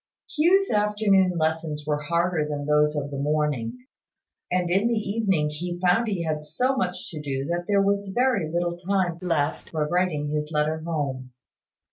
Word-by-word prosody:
Hugh's 370 +6 +4
afternoon 205 -4 +3
lessons 160 -1 -1
were 150 -1 -1
harder 170 0 0
than 145 -1 -3
those 150 0 +3
of 145 -1 -3
the 140 - -4
morning; 140 -5 -1 0.7
and 180 0 +1
in 195 +5 +3
the 235 - +1
evening 200 -8 0
he 175 +3 -4
found 185 +6 +3
he 195 -5 -1
had 155 -2 -2
so 255 - 0
much 185 -8 -3
to 155 -3 -6
do 135 -2 -3
that 175 +2 -2
there 200 -1 +3
was 200 0 +1
very 225 -7 +1
little 175 0 -1
time 180 -2 0
left 165 -5 -1
for 155 -2 -1
writing 165 -4 0
his 150 0 -2
letter 155 +1 0
home. 140 -6 -3
170 Hz, 170 wpm, -25 LUFS, 150-195 Hz, 0.7 s, Hugh's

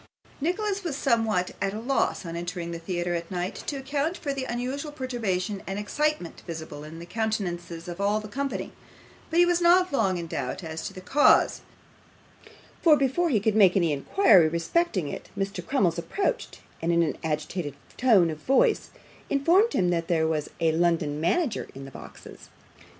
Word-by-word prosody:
Nicholas 395 +5 -1
was 330 -6 -2
somewhat 225 -9 +1
at 195 +1 -1
a - - -4
loss, 250 -4 0
on 165 0 -5
entering 175 0 -4
the 170 - -5
theatre 175 0 -2
at 170 -1 -3
night, 180 0 -3
to 290 - -5
account 280 +5 -2
for 285 -3 -3
the 270 -1 -3
unusual 260 +5 -3
perturbation 220 -8 -2
and 195 +1 -3
excitement 250 - -1
visible 160 -3 -7
in 155 +2 -9
the 170 - -8
countenances 175 -5 -3
of 175 +2 -6
all 205 +2 +2
the 215 - -8
company, 275 +5 -3 0.6
but 325 - -1
he 350 - +7
was 350 0 +2
not 355 -1 +4
long 190 -9 +2
in 170 - -4
doubt 160 +2 -4
as 160 0 -5
to - - -7
the 185 -1 -10
cause, 285 +10 +4 1.2
for 310 -3 +6
before 280 +6 +1
he 230 -8 +3
could 215 +1 +1
make 195 -3 +6
any 170 -5 +2
inquiry 175 - +5
respecting 170 - 0
it - - -7
Mr. 195 -2 -3
Crummles 175 -9 +1
approached, 400 - -2 0.2
and 165 - +1
in 170 0 +4
an 155 - -2
agitated 155 -1 -3 0.2
tone 205 -10 +4
of 155 - -7
voice, 415 - +2 0.4
informed 345 +11 +3
him 180 -1 +2
that 165 -1 -1
there 160 -2 +2
was 155 -2 -1
a 165 -1 +3
London 160 -3 +1
manager 235 - 0
in 135 0 -8
the 135 - -10
boxes. - - -12
195 Hz, 180 wpm, -26 LUFS, 170-275 Hz, 1.2 s, he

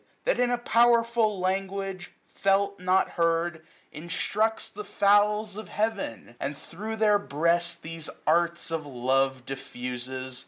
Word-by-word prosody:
That, - - +1
in 245 0 +3
a 245 - +1
powerful 235 -3 +3
language, 190 0 -2 0.2
felt 200 0 +1
not 185 +1 +3
heard. 165 -1 0 0.3
Instructs 200 +7 -1
the 210 - -8
fowls 205 +1 +3
of 215 - -7
heaven! 210 - -3
and 140 +1 -3
thro' 215 +10 -6
their 210 -2 +4
breast 170 0 0
These 165 -1 -7 0.2
arts 170 +1 +1
of 165 -1 -1
love 130 0 0
diflfuses 130 -1 -6
185 Hz, 125 wpm, -27 LUFS, 155-210 Hz, 0.3 s, their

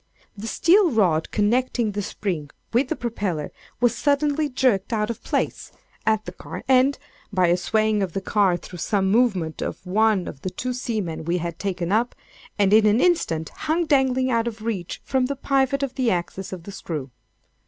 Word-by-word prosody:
The 210 +2 -6
steel 360 - +4
rod 185 - +2
connecting 235 +1 +1
the 205 +1 -3
spring 180 -7 -3 0.2
with 250 +3 +3
the 320 - -1
propeller 200 - -3 0.3
was 245 -1 +3
suddenly 290 +1 +1
jerked 250 -7 +1
out 215 0 0
of 230 - -9
place, - - -2 0.4
at 220 -1 +2
the - - -5
car - - -8
end, 260 +1 +4 0.3
(by 185 -3 +3
a 175 - +4
swaying 215 +3 +1
of 185 -4 -2
the - - -1
car 195 -2 +2
through 180 0 -10
some 195 +2 +1
movement 195 -9 +1
of - - -5
one 205 0 +2
of 140 - -8
the 185 - -3
two 250 +7 -3
seamen 215 -11 -3
we 170 +2 +1
had 170 -1 -4
taken 185 -3 -2
up,) 230 +4 +1 0.4
and 200 -1 +3
in 215 0 +6
an 210 +3 +4
instant 165 - +1
hung 320 +2 -1
dangling 260 -3 +2
out 230 0 +1
of 220 -2 -5
reach, 200 -7 -3
from 260 -1 +1
the 280 - -2
pivot 275 0 +1
of 270 -2 -2
the 255 -2 +1
axis 180 +1 -2
of 180 -3 -7
the 200 - -8
screw. 150 -8 -5
215 Hz, 190 wpm, -23 LUFS, 185-255 Hz, 0.4 s, in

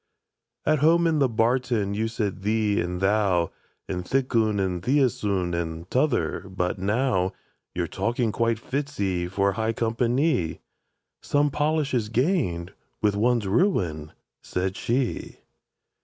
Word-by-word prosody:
—"At 155 -1 +3
home 165 +4 +4
in 160 -2 +2
the 135 -2 +3
barton 115 -2 +1
you 110 +2 0
said 105 -4 -3
'thee' 105 -1 +1
and 90 +1 -3
'thou,' 95 -4 +2 0.4
And 90 -1 -3
'thik 130 +5 -1
oon,' 110 -2 +2
and 90 -2 -1
'theäs 130 +1 +1
oon,' 95 -4 0
and 85 0 -3
't'other'; 130 -7 0
but 90 0 -2
now 100 -2 +1 0.4
Your 85 - 0
talking 115 +6 -1
quite 115 0 +1
fits 140 +5 -4
'ee 90 -3 0
for 100 +2 +1
high 110 +3 -1
compa 115 +1 0
ny!"— 125 - +1 0.6
"Some 145 0 +1
polish 150 0 0
is 115 -4 0
gained 115 - 0 0.3
with 105 -1 +3
one's 115 +1 +2
ruin," 95 - +1 0.3
said 95 +1 -2
she. 125 +1 -2
110 Hz, 140 wpm, -25 LUFS, 95-130 Hz, 0.6 s, home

